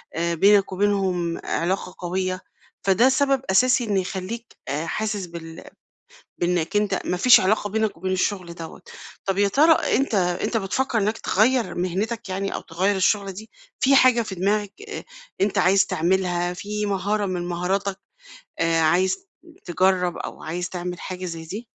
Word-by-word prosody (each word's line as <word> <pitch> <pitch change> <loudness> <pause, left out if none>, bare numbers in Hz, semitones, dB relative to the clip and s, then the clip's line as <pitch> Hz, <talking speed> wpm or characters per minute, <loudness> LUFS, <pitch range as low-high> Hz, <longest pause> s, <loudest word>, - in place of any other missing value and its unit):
آآ، 170 +1 0
بينَك 200 +3 +4
وبينهُم 190 -3 0
علاقة 180 +1 -2
قوية، 185 +1 -2 0.4
فده 200 +7 +4
سبب 275 0 +2
أساسي 250 +5 +4
إن 210 -4 0
يخليك 195 +5 -4 0.2
آآ، 150 +4 -2
حاسس 210 +1 -2
بال 165 -1 -9 0.7
بإنَّك 175 0 -1
أنت 205 -2 +1
ما 180 - -1
فيش 245 +7 +7
علاقة 205 +2 +1
بينك 220 -1 -1
وبين 185 +2 -3
الشغل 185 -2 -1
دوَّة، 165 0 -9 0.4
طَب 195 -1 -1
يا 205 0 +4
ترى 300 +11 +5 0.2
أنت 270 -4 0
أنت 180 +4 0
بتفكّر 225 +5 -1
إنَّك 215 +1 0
تغيّر 235 +4 +1
مِهنتَك 200 +5 -2
يعني، 195 +1 -2
أو - - -4
تغيّر 185 +5 0
الشُغلة 195 +1 +1
دي؟ 215 +4 -10 0.3
في 275 +1 +4
حاجة 255 -3 +5
في 210 -4 -5
دماغَك 205 +2 0 0.2
أ 420 - -6 0.4
أنت 200 0 +1
عايز 190 +1 +4
تعملها، 175 0 0
في 210 +3 -4
مهارة 205 +1 0
من 180 -2 -3
مهاراتَك 190 +3 -1 0.6
آآ، 165 0 +2
عايز 185 - +2 0.4
تجرّب 180 0 +1
أو - - -7
عايز 175 +3 -3
تعمل 180 -1 -5
حاجة 185 0 -6
زي 165 -2 -5
دي؟ 205 +9 -7
190 Hz, 155 wpm, -23 LUFS, 180-210 Hz, 0.7 s, فيش